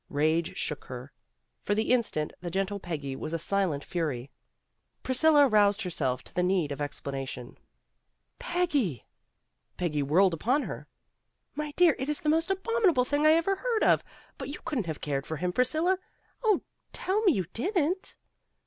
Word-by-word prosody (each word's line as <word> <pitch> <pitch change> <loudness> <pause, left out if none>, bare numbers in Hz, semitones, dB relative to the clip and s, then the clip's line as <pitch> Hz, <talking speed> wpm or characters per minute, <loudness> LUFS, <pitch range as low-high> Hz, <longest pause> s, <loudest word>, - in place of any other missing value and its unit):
Rage 155 +3 +1
shook 150 - -3
her. 130 +2 -8 0.5
For 205 - 0
the 220 +2 0
instant, 205 -11 0
the 175 - -4
gentle 195 +2 -1
Peggy 145 -7 -4
was 155 +4 -5
a - - +1
silent 165 -4 0
fury. 140 -7 -3 0.7
Priscilla 290 +2 +5
roused 210 -2 +3
herself 135 -8 -2
to - - -9
the 180 - +1
need 180 -5 +1
of 140 - -4
ex 145 0 -3
planation. 135 -3 -6 0.3
' - - -50
* - - -49
Peggy! 290 - 0 0.3
' - - -51
' - - -49
Peggy 155 -5 0
whirled 170 +6 +4
upon 250 - +1
her. - - -7 0.7
"My 300 +1 -3
dear, 350 -4 +5
it 265 +3 -2
is 300 +3 -1
the 305 - 0
most 325 +3 +2
abominable 385 - +2
thing 290 +3 +2
I 310 - +7
ever 335 +4 +2
heard 465 0 0
of, - - +4 0.4
but 270 -1 -5
you 285 - -5
couldn't 240 - -2
have 155 -2 -4
cared 140 -1 -2
for 160 - -3
him, 180 +3 -1
Priscilla. 315 - +2 0.4
Oh, 425 -5 +3 0.3
tell 395 +3 0
me 385 -7 +5
you 185 -7 -1
didn't." 360 - -1
200 Hz, 180 wpm, -28 LUFS, -, 0.7 s, I